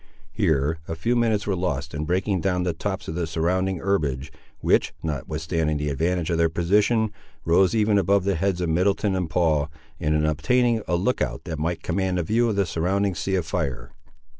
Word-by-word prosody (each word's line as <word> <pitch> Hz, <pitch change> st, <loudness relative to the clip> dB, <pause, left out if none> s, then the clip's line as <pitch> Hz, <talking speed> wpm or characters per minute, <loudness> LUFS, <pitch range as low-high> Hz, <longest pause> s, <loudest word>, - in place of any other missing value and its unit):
Here 75 Hz, +2 st, +1 dB
a 80 Hz, -, -3 dB
few 115 Hz, +10 st, 0 dB
minutes 110 Hz, -3 st, +1 dB
were 100 Hz, -, 0 dB
lost 85 Hz, -7 st, -2 dB
in 75 Hz, +1 st, -3 dB
breaking 90 Hz, +2 st, 0 dB
down 90 Hz, -1 st, 0 dB
the 90 Hz, -1 st, 0 dB
tops 95 Hz, +4 st, -4 dB
of -, -, -3 dB
the 85 Hz, 0 st, -2 dB
surrounding 90 Hz, +4 st, 0 dB
herbage, 75 Hz, -8 st, -1 dB, 0.3 s
which, -, -, +2 dB
notwithstanding 75 Hz, +1 st, -2 dB
the 75 Hz, 0 st, -2 dB
advantage 85 Hz, +4 st, 0 dB
of 85 Hz, -, 0 dB
their 85 Hz, 0 st, +4 dB
position, 105 Hz, +6 st, +2 dB, 0.3 s
rose 90 Hz, +5 st, +4 dB
even 105 Hz, -2 st, +3 dB
above 100 Hz, +1 st, +2 dB
the 100 Hz, +1 st, +1 dB
heads 90 Hz, +1 st, 0 dB
of 85 Hz, -, 0 dB
Middleton 95 Hz, +4 st, +1 dB
and 90 Hz, -3 st, -2 dB
Paul, 80 Hz, -3 st, +1 dB, 0.3 s
and 75 Hz, +1 st, +1 dB
in 75 Hz, 0 st, +2 dB
obtaining 115 Hz, -, +2 dB
a 90 Hz, -, +1 dB
look 100 Hz, +9 st, 0 dB
out -, -, -2 dB
that 80 Hz, -3 st, -5 dB
might 85 Hz, +2 st, -2 dB
command 95 Hz, +1 st, 0 dB
a 90 Hz, -, 0 dB
view 115 Hz, +7 st, +2 dB
of 110 Hz, -, -1 dB
the 100 Hz, -1 st, +2 dB
surrounding 95 Hz, +4 st, 0 dB
sea 95 Hz, +3 st, -1 dB
of 90 Hz, -3 st, 0 dB
fire. 80 Hz, -6 st, -3 dB
90 Hz, 200 wpm, -24 LUFS, 80-100 Hz, 0.3 s, their